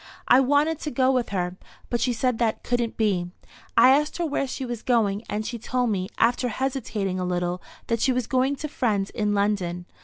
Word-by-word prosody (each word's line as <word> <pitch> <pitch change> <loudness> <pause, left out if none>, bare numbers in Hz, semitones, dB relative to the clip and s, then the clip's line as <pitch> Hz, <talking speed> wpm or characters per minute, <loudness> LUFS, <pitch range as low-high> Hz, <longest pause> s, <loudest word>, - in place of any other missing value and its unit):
I 250 - +7
wanted 290 +4 +2
to 305 - -4
go 260 0 +2
with 250 -2 0
her, 180 -2 -2 0.3
but 240 - 0
she 255 - +2
said 245 0 0
that 225 -2 0
couldn't 240 -2 -1
be. 190 -5 +1 0.5
I - - +8
asked 300 +2 +2
her 345 - 0
where 285 -3 -1
she 260 +1 -4
was 240 -2 -5
going, 215 -5 +1
and 215 +1 -2
she 235 0 -4
told 245 +1 0
me, 185 -2 -2
after 240 +2 +2
hesitating 225 -6 -2
a - - -1
little, 180 0 -1 0.2
that 230 -1 -1
she 265 - +3
was 250 -2 0
going 260 +3 +1
to 305 - -5
friends 215 -9 -1
in 210 -1 0
London. 190 -4 0
235 Hz, 210 wpm, -25 LUFS, 200-260 Hz, 0.5 s, I